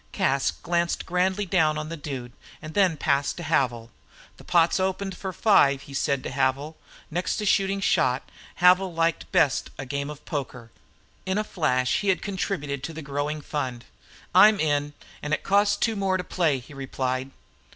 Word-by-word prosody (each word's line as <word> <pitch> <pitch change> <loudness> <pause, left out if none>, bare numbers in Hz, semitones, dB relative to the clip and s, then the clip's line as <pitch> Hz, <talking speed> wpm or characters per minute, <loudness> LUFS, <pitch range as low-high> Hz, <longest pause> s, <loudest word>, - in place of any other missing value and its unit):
Cas 135 0 +1
glanced 170 0 -1
grandly 185 +3 0
down 160 -5 +2
on 155 0 -4
the 165 - -4
Dude, 135 -5 -6 0.3
and 155 0 -9
then 185 -4 +3
passed 140 -1 0
to 175 - -6
Havil. 125 -7 0 0.5
"The - - -14
pot's 170 +1 +3
opened 190 0 -2
for 190 +1 -5
five," 140 -9 +3
he 140 - -12
said 135 -1 0
to - - -5
Havil. 135 +3 0 0.4
Next 175 +3 -1
to 210 - -2
shooting 195 0 +2
shot, 130 -9 +1 0.3
Havil 180 0 +4
liked 165 0 0
best 140 -4 +2
a 135 - -5
game 140 +2 -3
of 150 -1 -10
poker. 125 -5 -5 0.6
In 190 +1 0
a 215 - +1
flash 130 -10 0
he 200 - -1
had 190 - +1
contributed 180 -8 -3
to 165 - -6
the 160 0 -7
growing 145 +2 -3
fund. 130 -5 -4 0.5
"I'm 210 -1 +7
in, 145 -1 0 0.3
and 150 +1 0
it - - -10
costs 205 +1 +3
two 225 +2 0
more 195 -2 0
to 180 - -4
play," 165 -6 +1
he 130 +3 -12
replied. 130 -1 -3
155 Hz, 180 wpm, -25 LUFS, 140-185 Hz, 0.6 s, I'm